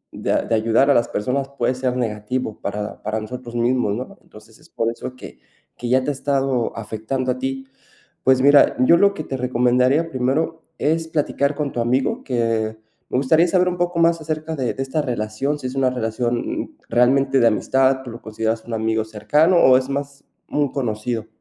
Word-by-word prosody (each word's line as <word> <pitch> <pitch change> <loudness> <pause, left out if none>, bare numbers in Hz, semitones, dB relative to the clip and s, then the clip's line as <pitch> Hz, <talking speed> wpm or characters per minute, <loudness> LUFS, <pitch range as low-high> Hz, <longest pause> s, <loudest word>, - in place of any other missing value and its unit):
de - - -2
a - - +2
de - - -3
ayudar 115 +5 +3
a - - +6
las 120 -2 +2
personas 135 +6 -2
puede 125 +1 +1
ser 130 0 -2
negativo, 110 0 -3
para 105 +1 -5
para 110 +1 -2
nosotros 120 +2 -8
mismos, 120 -3 +1
¿no? 130 - -7
Entonces, 110 +1 -17
es - - -21
por 115 0 -1
eso 125 +2 -7
que 130 - -12 0.4
que 120 - -5
ya 130 +1 +3
te 145 - -2
ha - - -3
estado 135 -3 0
afectando 115 +4 -3
a 125 - -4
ti. 135 0 -3 0.6
Pues 130 0 +4
mira, 145 +1 +6
yo 130 +7 +6
lo 200 +2 +4
que 155 - -6
te 135 - -4
recomendaría 125 +5 +2
primero, 150 +5 -1 0.2
es 160 +2 0
platicar 150 -2 0
con 145 -1 -3
tu - - -4
amigo, 125 +3 0
que, 115 -3 -1 0.3
me - - 0
gustaría 160 +6 +4
saber 180 +1 +2
un 180 0 -1
poco 175 -1 -1
más 165 0 +3
acerca 155 0 -4
de 130 -5 -1
de 135 - -5
esta 150 +3 -2
relación. 125 +4 -2
Si 130 - -4
es 130 - -6
una 130 -1 +2
relación, 120 0 -2
mm, - - -8 0.2
realmente 135 +2 +3
de - - +4
amistad, 130 +4 +2
tú 125 - -8
lo 115 0 -9
consideras 110 +1 -2
un 120 - -6
amigo 110 0 0
cercano 150 - +2
o 130 -6 +6
es 130 +1 -2
más 140 0 -4 0.3
un 145 -3 0
conocido. 115 -3 -3
130 Hz, 200 wpm, -21 LUFS, 115-140 Hz, 0.6 s, a